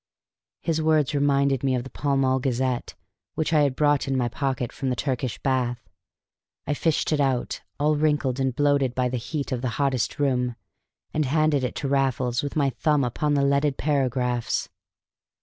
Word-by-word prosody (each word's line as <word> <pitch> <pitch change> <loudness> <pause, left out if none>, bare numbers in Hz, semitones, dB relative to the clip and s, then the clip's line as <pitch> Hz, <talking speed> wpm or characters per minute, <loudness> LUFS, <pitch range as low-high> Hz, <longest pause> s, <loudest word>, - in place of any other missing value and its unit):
His 160 -2 0
words 155 -2 +2
reminded 140 -2 +2
me 135 -2 +2
of 125 - -2
the 130 - -10
Pall 140 -1 0
Mall 130 -1 +2
Gazette, 130 -1 -1 0.4
which 160 +1 -1
I 155 - +5
had 140 -3 +2
brought 145 -1 +2
in 135 -1 0
my 120 -2 +1
pocket 130 -1 -2
from 135 - -3
the 125 - 0
Turkish 130 -2 -2
bath. 125 -2 -1 0.8
I - - 0
fished 160 +2 0
it 155 - +1
out, 130 -3 0 0.2
all 150 +1 +3
wrinkled 145 -4 +1
and 130 -2 0
bloated 140 -3 +2
by 125 -1 +1
the 125 - -2
heat 140 +4 -4
of 125 -2 -1
the 130 - -1
hottest 135 -3 0
room, 125 -4 0 0.6
and 155 -1 +1
handed 150 0 +2
it 125 - -2
to 140 - -3
Raffles 130 -3 +1
with 145 - -5
my 140 -3 +2
thumb 145 +3 +1
upon 145 +5 0
the 140 -1 +2
leaded 140 0 +2
paragraphs. 125 -4 0
135 Hz, 185 wpm, -25 LUFS, 125-145 Hz, 0.8 s, I